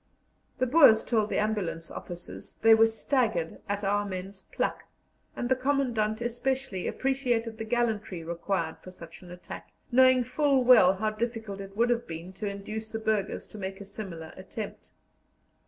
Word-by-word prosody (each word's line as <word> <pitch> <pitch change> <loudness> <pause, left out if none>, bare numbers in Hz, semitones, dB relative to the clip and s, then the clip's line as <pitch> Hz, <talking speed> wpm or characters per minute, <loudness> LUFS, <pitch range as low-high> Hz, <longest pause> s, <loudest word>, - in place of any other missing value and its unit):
The 255 - +2
Boers 255 -5 +7
told 215 -3 +1
the - - -1
ambulance 205 -6 -1
officers 175 0 -8
they 225 0 +8
were 225 0 +6
staggered 225 - -1
at 205 0 -2
our 205 +1 +1
men's 190 0 -6
pluck, - - -2 0.5
and 240 - -2
the 260 - +3
Commandant 245 -5 0
especially 240 -3 -2
appreciated 245 -4 -1
the 225 - -3
gallantry 220 -7 -1
required 170 0 -2
for - - -11
such 170 -3 -12
an 180 - -13
attack, 180 0 -9 0.2
knowing 255 0 +6
full 270 +1 +2
well 235 -7 +7
how 215 +3 -1
difficult 220 -3 -4
it 195 +1 -10
would 240 +2 +3
have 240 0 -1
been 170 +3 -7
to 205 +2 -4
induce 215 +2 -6
the 225 - -4
burghers 220 -2 -1
to 215 - -11
make 190 0 -5
a 200 - -8
similar 175 -6 -8
attempt. 200 +3 -7
215 Hz, 165 wpm, -28 LUFS, 190-240 Hz, 0.5 s, they